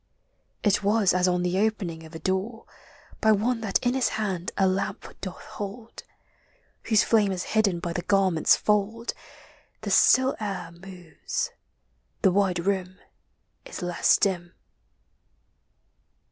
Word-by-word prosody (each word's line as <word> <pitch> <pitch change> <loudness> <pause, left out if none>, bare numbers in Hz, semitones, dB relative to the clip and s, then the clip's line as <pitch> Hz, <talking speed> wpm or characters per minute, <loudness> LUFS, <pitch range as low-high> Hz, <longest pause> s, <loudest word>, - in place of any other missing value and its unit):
It 205 -2 +3
was 205 -1 +3
as 180 0 +2
on 180 -1 +1
the 180 +1 0
opening 195 -7 -1
of 160 - -14
a - - -4
door 190 +7 -2
LIGHT: - - -35
DAY: - - -29
NIGHT. - - -24
39 220 -1 +5
By 210 - -2
one 245 -2 0
that 220 +2 -1
in 245 - +2
his 265 -1 +1
hand 190 -5 -3
a 195 - +3
lamp 190 +1 -3
doth 185 -2 -5
hold, 210 +3 -8 0.8
Whose 220 -1 +4
flame 210 -3 +3
is 180 -1 -3
hidden 205 -5 +1
by 170 -1 -4
the 175 - -2
garment's 190 -4 +3
fold 215 +3 0 0.3
— - - -30
The - - -4
still 260 +1 +5
air 195 -5 -4
moves, 175 -2 -6 0.7
the 190 - +5
wide 185 -2 +1
room 190 -1 -1 0.7
is - - -8
less 175 0 +3
dim. 175 -3 -1
195 Hz, 155 wpm, -26 LUFS, 180-215 Hz, 0.8 s, 39